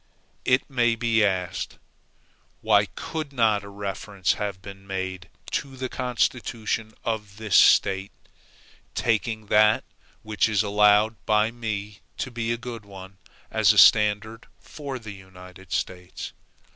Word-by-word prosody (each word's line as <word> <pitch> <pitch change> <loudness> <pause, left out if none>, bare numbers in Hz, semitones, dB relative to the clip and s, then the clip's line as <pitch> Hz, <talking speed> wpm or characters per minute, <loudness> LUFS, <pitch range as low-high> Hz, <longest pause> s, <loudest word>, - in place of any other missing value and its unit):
It 130 +1 +2
may 120 -4 +2
be 115 -1 +2
asked, 95 -2 -2 0.8
Why 105 -2 +4
could 155 -3 -6
not 110 -6 +2
a 100 - -10
reference 100 -1 -2
have 100 -2 -4
been 100 0 -12
made 95 -1 -4 0.2
to 135 -2 -3
the 130 0 -4
constitution 115 -3 -2
of 105 -3 -4
this 110 -3 -1
State, 95 0 +5 0.8
taking 110 -1 0
that, 105 0 +5 0.4
which 110 0 +1
is 105 -1 +2
allowed 105 +1 +3
by 105 +1 +3
me 105 -3 -5 0.2
to 130 - -4
be 115 -1 -2
a 120 - -1
good 120 -2 -7
one, 95 -1 -12 0.3
as - - +4
a - - -4
standard 105 +1 +4
for 140 -3 -7
the 110 -4 -9
United 95 -1 -14
States? 90 0 -4
105 Hz, 130 wpm, -25 LUFS, 100-115 Hz, 0.8 s, State